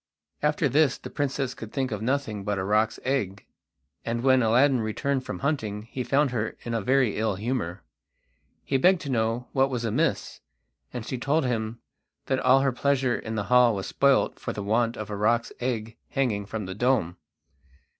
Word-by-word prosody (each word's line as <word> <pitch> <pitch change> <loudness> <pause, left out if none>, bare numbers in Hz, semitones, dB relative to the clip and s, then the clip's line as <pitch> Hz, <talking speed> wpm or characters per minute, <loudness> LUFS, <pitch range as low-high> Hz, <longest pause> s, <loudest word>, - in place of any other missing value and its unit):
After 150 +1 +2
this 140 0 +3
the - - -10
princess 135 -2 -2
could 110 -1 -9
think 130 -3 -2
of 105 -2 -3
nothing 115 -4 -1
but 105 0 -1
a 95 - -1
roc's 105 +3 +1
egg, 105 -7 -2 0.6
and 115 +1 -2
when 130 -1 +5
Aladdin 125 +3 +4
returned 130 +5 -1
from - - -4
hunting 110 -8 -1
he 130 - -3
found 140 +1 +2
her 115 -3 -2
in 120 - -4
a 115 - 0
very 130 0 +2
ill 110 -2 0
humour. 100 -4 -3 0.8
He 135 - +1
begged 180 +6 +4
to 140 - -4
know 115 +1 0
what 135 0 +2
was 120 -3 -2
amiss, 110 - -1 0.5
and 120 -3 -5
she 130 - -4
told 145 +3 +1
him 115 -2 -2 0.4
that 130 -1 0
all 135 +1 +5
her 135 -1 +2
pleasure 130 -1 +1
in 110 0 -5
the 105 - -1
hall 125 +1 +4
was 95 - -4
spoilt 140 -1 +2
for - - -4
the 105 - -5
want 115 +3 +1
of 110 0 -6
a - - -2
roc's 115 +3 +1
egg 115 -3 -3
hanging 110 -7 -1
from 110 -1 -4
the 95 - -5
dome. 105 -6 +1
120 Hz, 190 wpm, -26 LUFS, 110-135 Hz, 0.8 s, when